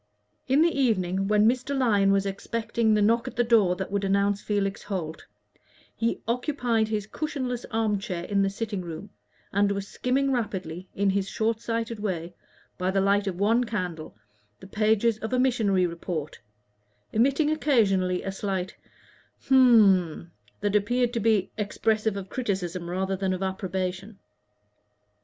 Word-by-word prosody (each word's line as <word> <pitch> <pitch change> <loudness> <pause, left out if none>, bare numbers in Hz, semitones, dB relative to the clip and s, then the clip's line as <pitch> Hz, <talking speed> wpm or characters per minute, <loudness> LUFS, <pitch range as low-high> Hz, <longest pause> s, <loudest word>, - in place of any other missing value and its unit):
In 280 +4 +4
the 340 - +2
evening, 195 -7 +1
when 210 +1 +4
Mr. 255 +3 0
Lyon 205 -6 +3
was 195 0 +2
expecting 220 +2 -1
the 210 - +3
knock 230 +3 +2
at - - -6
the 240 - +2
door 220 -6 +3
that 190 +1 -5
would 200 0 -1
announce 200 +1 +1
Felix 200 -1 -1
Holt, 170 -6 -5 0.7
he 230 0 -1
occupied 240 -2 0
his 215 -2 -2
cushionless 255 -1 -4
arm 220 -3 0
chair 185 -5 -4
in 200 +1 0
the 195 - +2
sitting 205 -1 -4
room, 175 +4 -8 0.4
and 200 +1 +3
was 200 0 -3
skimming 270 +4 0
rapidly, 190 -7 -3
in 200 0 +2
his 195 0 -1
short 225 0 -1
sighted 230 -1 -3
way, 180 -4 -3 0.5
by 180 +1 0
the 195 +1 +1
light 200 +1 +2
of 185 -2 -3
one 225 +5 +3
candle, 180 - -4 0.4
the - - -12
pages 215 +2 +1
of 220 +3 -4
a 255 - +2
missionary 220 -8 +2
report, 170 -3 -5 0.7
emitting 275 +7 +2
occasionally 200 -12 +2
a 195 - -3
slight 190 -2 -3 0.7
"Hm 215 -10 +6
m" 170 - -13 0.3
that 205 0 0
appeared 240 +4 +1
to 235 - 0
be 220 -3 +2
expressive 215 0 0
of 195 -1 -6
criticism 185 -7 -3
rather 190 +2 -1
than 190 0 -1
of 185 +1 -3
approbation. 190 +1 -3
205 Hz, 155 wpm, -26 LUFS, 190-230 Hz, 0.7 s, Hm